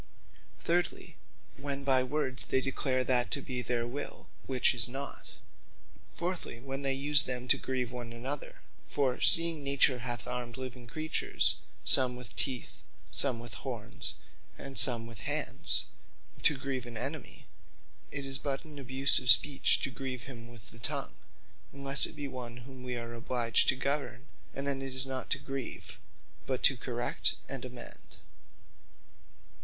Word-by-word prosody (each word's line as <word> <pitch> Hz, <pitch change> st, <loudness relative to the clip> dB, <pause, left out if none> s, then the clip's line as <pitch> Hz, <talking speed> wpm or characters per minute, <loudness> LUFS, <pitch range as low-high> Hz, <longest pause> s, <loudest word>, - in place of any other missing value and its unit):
Thirdly, 175 Hz, +1 st, -2 dB, 0.4 s
when 140 Hz, 0 st, -2 dB
by 135 Hz, -2 st, +5 dB
words 130 Hz, 0 st, -1 dB
they 130 Hz, -, +1 dB
declare 130 Hz, -1 st, -1 dB
that 125 Hz, -1 st, +3 dB
to 145 Hz, -, 0 dB
be 130 Hz, -2 st, -4 dB
their 120 Hz, -1 st, -1 dB
will, 135 Hz, +5 st, -6 dB, 0.2 s
which 130 Hz, -2 st, +2 dB
is 120 Hz, 0 st, +6 dB
not. 135 Hz, +2 st, -5 dB, 0.8 s
Fourthly, 175 Hz, -8 st, -4 dB
when 135 Hz, +2 st, -6 dB
they 135 Hz, -1 st, +1 dB
use 145 Hz, +1 st, +8 dB
them 125 Hz, -1 st, -3 dB
to -, -, +5 dB
grieve 125 Hz, -2 st, -3 dB
one 120 Hz, -2 st, -6 dB
another: 130 Hz, +5 st, -4 dB, 0.3 s
for 130 Hz, -3 st, -1 dB
seeing 165 Hz, -3 st, +5 dB
nature 140 Hz, -2 st, +3 dB
hath 120 Hz, 0 st, -3 dB
armed 125 Hz, 0 st, -4 dB
living 130 Hz, -2 st, -7 dB
creatures, 155 Hz, +6 st, +2 dB, 0.3 s
some 125 Hz, -2 st, +5 dB
with 125 Hz, -4 st, -10 dB
teeth, 130 Hz, -4 st, -3 dB, 0.3 s
some 130 Hz, -4 st, +5 dB
with 120 Hz, -2 st, -8 dB
horns, -, -, -2 dB, 0.4 s
and 135 Hz, -1 st, -6 dB
some 120 Hz, -3 st, +5 dB
with 115 Hz, -2 st, -9 dB
hands, -, -, +3 dB, 0.6 s
to 150 Hz, -, +3 dB
grieve 130 Hz, -2 st, -4 dB
an 120 Hz, -2 st, -6 dB
enemy, 135 Hz, +4 st, -4 dB, 0.6 s
it 140 Hz, -1 st, -4 dB
is 135 Hz, 0 st, -2 dB
but 140 Hz, 0 st, -3 dB
an 150 Hz, -2 st, -9 dB
abuse 135 Hz, +1 st, +3 dB
of 125 Hz, -1 st, +1 dB
Speech, 135 Hz, +5 st, +5 dB
to 135 Hz, -, -2 dB
grieve 130 Hz, -2 st, -6 dB
him 120 Hz, -3 st, -10 dB
with 120 Hz, -3 st, -12 dB
the 115 Hz, -, -14 dB
tongue, 140 Hz, +3 st, -2 dB, 0.5 s
unlesse 140 Hz, 0 st, +1 dB
it -, -, -12 dB
be 145 Hz, -1 st, -5 dB
one 120 Hz, -2 st, -7 dB
whom 130 Hz, -1 st, -12 dB
wee 125 Hz, -1 st, -5 dB
are 115 Hz, 0 st, -6 dB
obliged 120 Hz, 0 st, +1 dB
to -, -, +2 dB
govern; 140 Hz, -2 st, -2 dB, 0.3 s
and 135 Hz, -, -5 dB
then 140 Hz, -1 st, -1 dB
it 135 Hz, -1 st, -6 dB
is 130 Hz, +1 st, +2 dB
not 130 Hz, -1 st, -5 dB
to -, -, +1 dB
grieve, 135 Hz, -2 st, -7 dB, 0.5 s
but 130 Hz, -1 st, -2 dB
to 135 Hz, -, +5 dB
correct 120 Hz, 0 st, -1 dB
and -, -, -6 dB
amend. -, -, -9 dB
130 Hz, 160 wpm, -30 LUFS, 125-140 Hz, 0.8 s, use